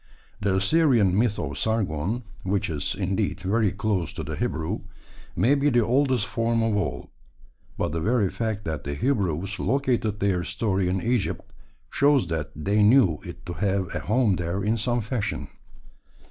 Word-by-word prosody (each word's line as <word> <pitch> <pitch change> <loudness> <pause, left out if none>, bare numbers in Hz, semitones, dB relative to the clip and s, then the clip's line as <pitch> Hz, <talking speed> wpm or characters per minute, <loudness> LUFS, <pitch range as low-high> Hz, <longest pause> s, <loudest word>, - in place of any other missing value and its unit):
The 100 -2 +1
Assyrian 110 - +3
myth 110 0 +2
of 70 +1 -4
Sargon, 105 +1 -1 0.2
which 95 -2 -1
is, 75 -2 -2
indeed, 95 +1 -1
very 100 +2 +1
close 100 -4 -1
to - - -5
the - - -4
Hebrew, 80 0 -2 0.6
may 130 - +3
be 145 +1 +3
the 120 -4 +3
oldest 130 -2 +2
form 115 +3 0
of 110 -2 +1
all; 100 - -3 0.7
but - - -1
the 80 +1 -2
very 110 +1 +2
fact 110 -3 -3
that 80 -3 -3
the 70 0 -4
Hebrews 100 - -1
located 120 -5 0
their 95 -3 +1
story 95 0 0
in 95 0 -1
Egypt 120 -3 -1 0.4
shows 140 -4 +3
that 80 -2 -2
they 100 +7 +1
knew 105 - +5
it - - -10
to 85 - -5
have 95 -1 -1
a - - -2
home 110 -4 +2
there 90 +3 -2
in 110 +3 +1
some 120 +2 0
fashion. 110 0 -3
105 Hz, 165 wpm, -25 LUFS, 95-115 Hz, 0.7 s, knew